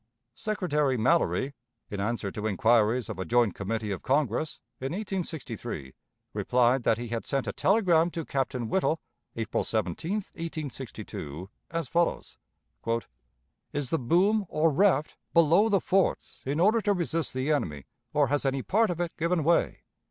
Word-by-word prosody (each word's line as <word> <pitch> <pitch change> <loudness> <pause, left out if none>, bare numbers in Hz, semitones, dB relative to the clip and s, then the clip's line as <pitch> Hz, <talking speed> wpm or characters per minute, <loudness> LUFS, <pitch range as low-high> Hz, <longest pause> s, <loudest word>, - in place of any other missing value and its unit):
Secretary 170 - 0
Mallory, 140 +2 +2 0.4
in 100 - -3
answer 105 -1 -1
to 105 +2 -3
inquiries 110 +3 +3
of - - -6
a - - -1
joint 120 0 +2
committee 105 +1 -3
of 95 - -3
Congress, 140 +1 0 0.2
in 135 +4 -3
1863, 160 - -4 0.4
replied 125 +1 +2
that 115 - +2
he 120 0 -5
had 115 0 -2
sent 135 -3 -1
a 100 - -3
telegram 180 -5 +3
to 165 -2 -5
Captain 130 -3 -1
Whittle, 165 +1 +1 0.4
April 110 -1 -1
17, 160 - -1
1862, 135 - -6 0.2
as 165 -3 -2
follows: 170 +5 -1 1.3
"Is 145 -3 -2
the 165 - +2
boom, 190 - +3
or 155 +1 +2
raft, 155 -2 +2 0.2
below 170 +6 +5
the 200 -2 +4
forts 195 +1 0
in 145 +3 0
order 215 +6 +4
to 205 -1 +2
resist 165 -6 -1
the 130 +4 0
enemy, 75 - -1 0.3
or 145 -2 +2
has 145 +1 +1
any 135 -1 0
part 220 +3 +2
of 175 -1 -3
it 175 -1 -2
given 170 0 +1
way? 170 +3 +2
145 Hz, 150 wpm, -28 LUFS, 115-170 Hz, 1.3 s, below